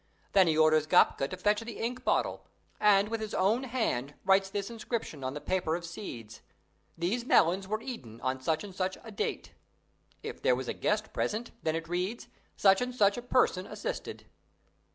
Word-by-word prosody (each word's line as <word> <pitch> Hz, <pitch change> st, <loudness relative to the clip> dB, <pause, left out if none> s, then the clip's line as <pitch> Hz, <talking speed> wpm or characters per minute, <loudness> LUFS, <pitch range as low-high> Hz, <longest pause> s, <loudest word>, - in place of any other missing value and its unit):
Then 190 Hz, -3 st, +5 dB
he 155 Hz, -1 st, +2 dB
orders 155 Hz, -1 st, +4 dB
Gapka 135 Hz, -, +4 dB
to 185 Hz, -, -6 dB
fetch 210 Hz, +3 st, +2 dB
the 230 Hz, 0 st, -7 dB
ink 250 Hz, +2 st, -3 dB
bottle, -, -, 0 dB, 0.3 s
and, 205 Hz, 0 st, +5 dB
with 225 Hz, 0 st, -2 dB
his 215 Hz, -2 st, -4 dB
own 220 Hz, +8 st, +2 dB
hand, 185 Hz, -, -1 dB
writes 195 Hz, 0 st, +4 dB
this 200 Hz, +2 st, -3 dB
inscription 225 Hz, -, -4 dB
on 130 Hz, +2 st, -3 dB
the -, -, -3 dB
paper 180 Hz, -1 st, 0 dB
of 170 Hz, 0 st, -5 dB
seeds: 120 Hz, -, -8 dB, 0.6 s
"These 190 Hz, +9 st, -1 dB
melons 190 Hz, -5 st, +3 dB
were 215 Hz, +2 st, -2 dB
eaten 120 Hz, -, -7 dB
on 130 Hz, 0 st, -2 dB
such 160 Hz, +3 st, 0 dB
and 200 Hz, -2 st, -8 dB
such 185 Hz, 0 st, -2 dB
a 225 Hz, -, -9 dB
date." 205 Hz, -, -3 dB, 0.7 s
If -, -, -6 dB
there -, -, +4 dB
was -, -, -5 dB
a -, -, -1 dB
guest -, -, -1 dB
present, 220 Hz, +3 st, -2 dB
then 160 Hz, 0 st, 0 dB
it 165 Hz, 0 st, -4 dB
reads, 180 Hz, +7 st, -3 dB, 0.3 s
"Such 195 Hz, +1 st, +5 dB
and 250 Hz, 0 st, -2 dB
such 205 Hz, -4 st, +4 dB
a 245 Hz, -, -4 dB
person 240 Hz, -7 st, +2 dB
assisted." -, -, -5 dB
195 Hz, 190 wpm, -30 LUFS, 160-225 Hz, 0.7 s, Then